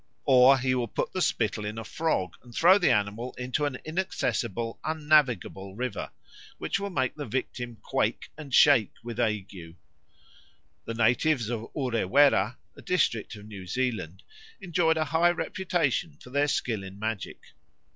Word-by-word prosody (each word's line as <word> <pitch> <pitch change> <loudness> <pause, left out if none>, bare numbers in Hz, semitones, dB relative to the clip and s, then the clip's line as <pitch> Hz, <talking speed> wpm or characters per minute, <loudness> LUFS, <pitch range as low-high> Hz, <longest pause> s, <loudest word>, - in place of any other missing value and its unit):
Or 130 0 +7
he 130 -1 0
will 125 -2 0
put - - -3
the 185 - -2
spittle 110 - 0
in 105 +1 -5
a 115 - -4
frog 105 - -1
and 120 -2 -15
throw 185 +4 +6
the 180 - +3
animal 105 +4 0
into 125 +4 -1
an 135 -4 -2
inaccessible, 120 - -2
unnavigable 145 - +1
river, 125 +2 -4 0.5
which - - -2
will 200 0 -3
make 130 -8 -1
the 145 -3 -6
victim 120 0 -4
quake - - -1
and 150 -3 -10
shake 125 -5 +5
with 120 0 -6
ague. 100 -7 -3 1.1
The 115 - -4
natives 120 +1 +2
of 115 -1 -5
Urewera, 125 -3 +3 0.2
a - - -13
district 115 - 0
of 105 0 -12
New 100 -4 -9
Zealand, 110 -6 -3 0.4
enjoyed 170 -4 +1
a 155 - +1
high 165 +3 +3
reputation 175 -3 -1
for 125 - -14
their 145 +2 +2
skill 115 -7 -1
in 95 +1 -9
magic. 110 -1 -4
125 Hz, 155 wpm, -27 LUFS, 110-150 Hz, 1.1 s, Or